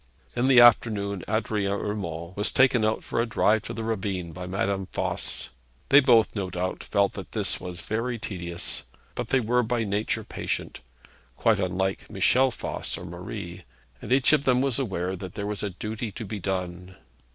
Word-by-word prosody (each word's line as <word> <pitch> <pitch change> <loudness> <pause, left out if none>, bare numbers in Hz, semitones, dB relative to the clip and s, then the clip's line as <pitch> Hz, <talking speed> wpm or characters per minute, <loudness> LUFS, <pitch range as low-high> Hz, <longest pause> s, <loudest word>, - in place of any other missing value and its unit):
In 125 +2 +2
the 130 -2 +7
afternoon 105 -4 +5
Adrian 105 -2 0
Urmand 95 -5 -4
was 105 +1 0
taken 130 -3 +4
out 110 0 +1
for - - -1
a 120 - -1
drive 110 -1 +3
to - - -6
the 115 - -4
ravine 95 -6 -2
by 90 +2 -7
Madame 95 0 -1
Voss. - - -3 0.4
They 140 - +9
both, 120 -6 +4
no 95 -3 -2
doubt, 90 +1 -3
felt 100 0 +1
that - - -8
this - - 0
was 90 -1 -7
very 115 +6 -2
tedious; 90 -5 -4 0.3
but 120 - -4
they 130 - +3
were 125 +1 +2
by 120 0 0
nature 105 +1 -1
patient - - -4 0.6
quite - - +3
unlike 95 +1 -1
Michel 130 +1 +3
Voss 120 - -4
or - - -8
Marie - - -7 0.4
and - - -7
each 130 +2 +5
of 150 -2 +4
them 125 -3 +3
was 135 -1 +1
aware 95 -7 -2
that 95 -1 -8
there 100 - -3
was 105 0 -3
a 105 - -1
duty 105 +4 -5
to 115 +2 -6
be 105 +1 -5
done. 90 -1 -4
105 Hz, 185 wpm, -26 LUFS, 95-120 Hz, 0.6 s, They